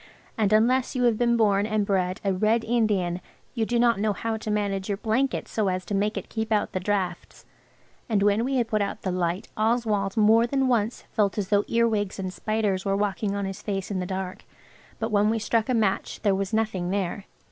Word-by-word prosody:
And 215 -4 +1
unless 245 +5 +3
you 250 - +1
have 240 -2 +4
been 235 +1 +2
born 205 -2 +3
and 215 -1 0
bred 185 -2 0
a 195 - +2
Red 215 +4 +2
Indian 205 -7 0 0.3
you 225 -3 -1
do 240 - 0
not 235 -3 +3
know 210 0 +1
how 225 +3 -3
to 220 0 -5
manage 200 -2 -1
your 200 - 0
blanket 240 +6 0
so 215 -3 -1
as 185 -1 -1
to - - -5
make 205 +2 0
it - - -5
keep 220 0 -4
out 210 -1 +1
the 185 - -2
draughts. 185 -2 -3 0.6
And 205 -3 +2
when 205 +2 +3
we 270 +2 -1
had 240 -3 +1
put 215 -2 0
out 200 - -3
the 185 - -1
light 180 +1 -2
Oswald 215 -2 0
more 225 +2 +5
than 270 +1 +1
once 230 -2 0
felt 205 -3 +1
as 200 -3 -2
though 205 -1 +3
earwigs 220 -4 +1
and 185 -2 -4
spiders 210 -3 -1
were 195 -1 0
walking 200 0 -1
on 200 -1 -2
his 195 +1 -6
face 195 -1 -3
in 190 - -1
the 180 - -3
dark, 190 -1 -5 0.5
but 225 0 -3
when 210 0 +3
we 225 - +1
struck 225 +1 0
a 255 - +2
match 210 -4 0
there 200 -2 +3
was 195 0 -2
nothing 215 -5 -1
there. 195 0 -2
210 Hz, 225 wpm, -25 LUFS, 195-225 Hz, 0.6 s, more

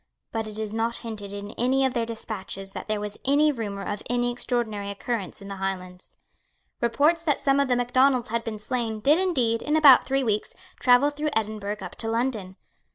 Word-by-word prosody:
But 225 -1 -2
it 215 0 -7
is 215 -1 -3
not 230 +1 0
hinted 210 -3 -6
in 205 0 -6
any 265 +3 +3
of 260 - 0
their 235 -3 -1
despatches 195 -4 -5
that - - -7
there 215 -1 -1
was 210 0 -5
any 290 +3 +4
rumour 205 -6 -4
of 205 +1 -4
any 245 0 +1
extraordinary 230 -4 -2
occurrence 200 -1 -4
in - - -9
the 195 -1 -6
Highlands. 185 -1 -5 0.6
Reports 290 +8 +3
that 300 -5 +1
some 275 0 +2
of 280 - +2
the 250 - +2
Macdonalds 250 0 +2
had 230 +1 -1
been 220 -2 -4
slain 225 0 -3
did 290 +9 +4
indeed, 255 -12 +1
in 300 - 0
about 285 -5 +8
three 270 0 0
weeks, 215 -3 -1 0.2
travel 255 +3 +5
through 300 +1 -2
Edinburgh 210 -1 -2
up 180 - -7
to 225 - -3
London. 225 -5 -2
230 Hz, 200 wpm, -25 LUFS, 210-260 Hz, 0.6 s, about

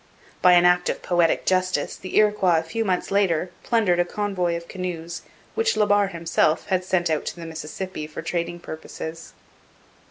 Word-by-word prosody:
By 180 0 +7
an 175 0 +6
act 180 0 +4
of - - -3
poetic 175 -2 +2
justice 185 0 +1
the 185 - -5
Iroquois 210 -5 +4
a 160 - 0
few 225 +8 -2
months 185 -3 -1
later 185 -3 +1
plundered 210 -7 +2
a - - +5
convoy 180 -2 -1
of 170 0 -10
canoes 175 -3 -5 0.3
which 455 - +1
La 210 - +4
Barre 205 -1 +3
himself 165 -3 +1
had 185 -1 +1
sent 175 -2 0
out 155 - 0
to - - -3
the 170 -1 -8
Mississippi 160 +1 -6
for 155 - -7
trading 175 0 -3
purposes. 160 0 -8
180 Hz, 180 wpm, -24 LUFS, 170-190 Hz, 0.3 s, By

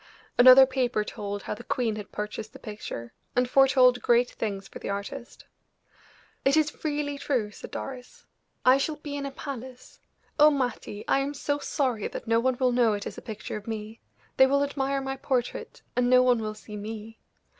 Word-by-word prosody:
Another 255 +2 +9
paper 250 -4 0
told 205 -1 -5
how - - -3
the 235 - -9
queen 235 -3 -1
had 210 -1 -8
purchased 210 +1 -5
the - - -10
picture, 165 - -7 0.2
and 250 0 +3
foretold 255 -1 +5
great 240 0 +3
things 195 -3 -4
for - - -10
the - - -6
artist. 205 +6 -6 1.0
"It 275 +3 +4
is 305 -1 0
really 290 -2 -2
true," 240 -9 -1
said - - -10
Doris. 255 -2 -8 0.4
"I 255 +2 +6
shall 305 +2 -1
be 295 -1 -7
in 280 -1 -3
a - - -6
palace. 260 -3 -8 0.4
Oh, 300 +1 +9
Mattie! 245 -7 -3
I - - +3
am 280 +1 -2
so 285 +1 -1
sorry 255 -8 -1
that - - -7
no 230 0 +3
one 255 +1 +1
will 255 -1 +3
know 240 -3 +3
it 205 -1 -4
is - - -6
a - - -15
picture 215 -2 -6
of 210 - -11
me; 220 0 -5 0.4
they 265 - +7
will 280 +1 +2
admire 275 -1 -1
my 270 0 -4
portrait, 255 -3 -3
and 245 0 +2
no 255 0 +6
one 250 -2 +3
will 215 -1 -4
see 215 0 -9
me. 220 +1 -7
250 Hz, 195 wpm, -27 LUFS, 215-270 Hz, 1.0 s, Another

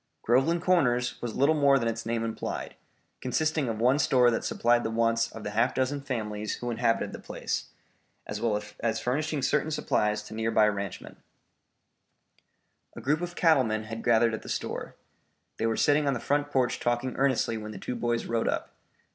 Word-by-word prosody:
Groveland 135 +9 +2
Corners 125 -10 +2
was 120 -2 -4
little 140 +4 +4
more 140 -2 +4
than 115 -3 -1
its 115 0 -3
name 115 0 -1
implied, 115 - -4 0.5
consisting 155 +1 0
of 110 - -2
one 130 +5 +3
store 125 -4 +4
that 115 - -1
supplied 120 0 +2
the - - -1
wants 115 0 +1
of 110 - -9
the 105 - -4
half 115 +4 +1
dozen 130 +2 0
families 110 -6 -3
who 120 0 -4
inhabited 115 -1 0
the - - -7
place, - - -4 0.6
as 105 0 -5
well 110 -3 +1 0.2
as 115 -1 0
furnishing 145 +3 -1
certain 150 +1 +1
supplies 105 -8 0
to 105 - -10
near 110 +1 -1
by 110 -1 +4
ranchmen. 100 -2 -5 1.8
A - - -7
group 150 +4 0
of 175 0 -5
cattle 160 -6 +4
men 110 -1 -2
had 115 +1 -7
gathered 115 -1 +4
at 110 - -4
the - - -10
store. - - -4 0.6
They 115 - 0
were 115 - 0
sitting 145 0 +3
on 140 - +2
the - - -3
front 145 +3 0
porch 130 -3 +1
talking 120 +1 -1
earnestly 130 -4 +1
when 110 -1 -6
the - - -8
two - - -4
boys 120 0 -1
rode 115 -1 -1
up. - - -2
120 Hz, 190 wpm, -28 LUFS, 115-140 Hz, 1.8 s, little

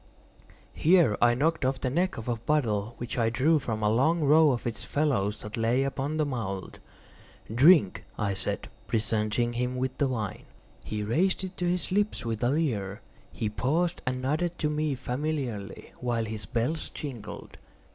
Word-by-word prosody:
Here 165 - +4
I 120 0 +5
knocked 160 +5 +1
off 130 0 0
the 130 - -1
neck 180 +6 0
of 115 - -7
a 120 - +1
bottle 115 -4 0
which 120 +1 -4
I 115 -1 +3
drew 145 +7 +3
from 110 -5 -3
a 105 - +4
long 155 +9 +3
row 155 +2 +6
of 125 -4 -1
its 120 -2 -3
fellows 120 -9 0
that 105 +2 -5
lay 115 +4 +2
upon 135 +2 -2
the 155 - +2
mould. 105 -9 -4 0.7
"Drink," 135 - +5 0.2
I 100 -2 0
said, - - -3 0.2
presenting 110 +2 0
him 125 +1 -2 0.2
the 140 - +3
wine. 110 -6 -4 0.4
He 105 -1 -3
raised 180 - +1
it 185 0 -6
to 175 -1 0
his 180 0 +2
lips 205 - +1
with 115 0 -2
a 120 - +3
leer. 115 -10 -1 0.3
He 110 - -2
paused 160 +11 0
and 130 0 -1
nodded 165 +6 0
to 150 -1 0
me 150 -1 0
familiarly, 125 -5 -4
while 120 -2 -1
his 105 -3 -5
bells 125 +7 -1
jingled. 125 -8 -8
125 Hz, 170 wpm, -28 LUFS, 110-155 Hz, 0.7 s, row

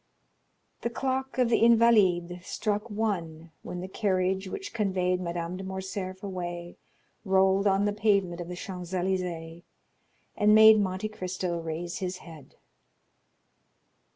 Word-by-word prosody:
The 235 - -1
clock 265 +2 -2
of 250 -2 +3
the 235 - +3
Invalides 190 -7 +4
struck 210 +1 -2
one 170 -7 -3
when 180 - -6
the 185 - -5
carriage 190 -1 0
which 395 - -6
conveyed 185 -4 0
Madame 170 0 -4
de 190 - -7
Morcerf 190 0 -5
rolled 195 -2 -5
away 175 -1 -6 0.5
on 195 0 +3
the 205 - +1
pavement 200 -5 +1
of 170 - -6
the 180 - -6
Champs 180 -1 -7
Élysées, 175 -3 -2 0.7
and 210 0 +4
made 220 0 +8
Monte 190 +1 -1
Cristo 185 -3 -3
raise 165 +1 -5
his 185 -1 -3
head. 160 -6 -14
190 Hz, 130 wpm, -28 LUFS, 175-210 Hz, 0.7 s, made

